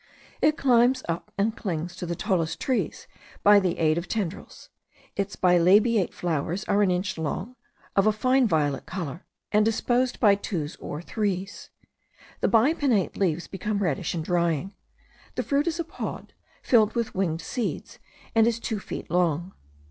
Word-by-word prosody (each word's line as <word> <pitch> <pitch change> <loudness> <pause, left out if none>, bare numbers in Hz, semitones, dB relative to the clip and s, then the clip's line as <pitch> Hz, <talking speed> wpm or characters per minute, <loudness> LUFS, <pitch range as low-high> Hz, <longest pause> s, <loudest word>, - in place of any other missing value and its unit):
It 305 +1 +3
climbs 250 -2 +3
up 170 +5 -4
and 215 +3 +1
clings 175 -4 -4
to 180 - -5
the 170 - -2
tallest 170 -5 -1
trees 260 -2 -1 0.4
by 205 0 +7
the 185 -3 -1
aid 160 0 +2
of 175 - -7
tendrils. 200 -5 -5 0.4
Its 200 0 -2
bilabiate 185 +4 +4
flowers 170 +3 -2
are 205 - +2
an 200 - +3
inch 180 0 -1
long, 185 +10 -3 0.4
of 195 +1 +4
a - - +6
fine 255 +4 +2
violet 150 -6 0
colour, 170 -3 -6 0.2
and 210 0 +4
disposed 245 +3 +1
by 210 -4 +6
twos 170 -6 -3
or 150 +3 -6
threes. 195 -1 -3 0.7
The - - +2
bipinnate 240 - +2
leaves 175 -3 0
become 205 +2 -3
reddish 175 -5 -1
in 165 - -2
drying. 170 +1 0 0.6
The - - -1
fruit 285 +3 +1
is 335 0 -1
a - - +1
pod, 330 - -7 0.3
filled 220 -2 +4
with 235 -1 -1
winged 170 -4 -1
seeds, 245 -4 -4 0.3
and 225 0 +5
is 230 -1 0
two 220 -2 -3
feet 185 - -7
long. 175 0 +1
195 Hz, 160 wpm, -26 LUFS, 170-225 Hz, 0.7 s, by